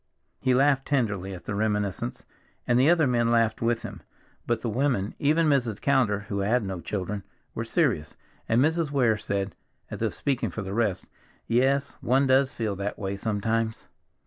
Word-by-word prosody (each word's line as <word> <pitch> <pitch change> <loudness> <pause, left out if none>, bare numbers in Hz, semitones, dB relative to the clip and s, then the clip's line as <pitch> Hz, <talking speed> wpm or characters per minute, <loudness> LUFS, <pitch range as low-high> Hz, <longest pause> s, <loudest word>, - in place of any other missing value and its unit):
He 130 -1 +2
laughed 135 0 +3
tenderly 100 -9 0
at 90 - -12
the - - -3
reminiscence, 105 - -2 0.4
and 120 0 +3
the 135 +4 +5
other 170 -3 +4
men 120 -2 +2
laughed 115 -2 +2
with 115 0 0
him, - - -7 0.5
but 120 - 0
the - - -1
women, 115 -4 0
even 155 +3 +3
Mrs. 125 -8 +1
Callender, 125 -8 +2
who 100 -1 -4
had 110 +5 +1
no 95 -2 -4
children, 100 +1 -3 0.3
were - - -3
serious, 75 -1 0 0.3
and 115 - +3
Mrs. 160 0 +1
Weir 125 -6 +3
said, 100 -1 -3 0.4
as - - -6
if - - -1
speaking 135 -3 -1
for 110 - -5
the 95 0 -5
rest, 105 -4 0 0.4
"Yes, 135 +3 +1
one 135 +3 +3
does 130 0 +3
feel 110 -3 -2
that 100 +1 -3
way 95 0 -3
sometimes." 110 +2 -2
115 Hz, 175 wpm, -26 LUFS, 100-135 Hz, 0.5 s, the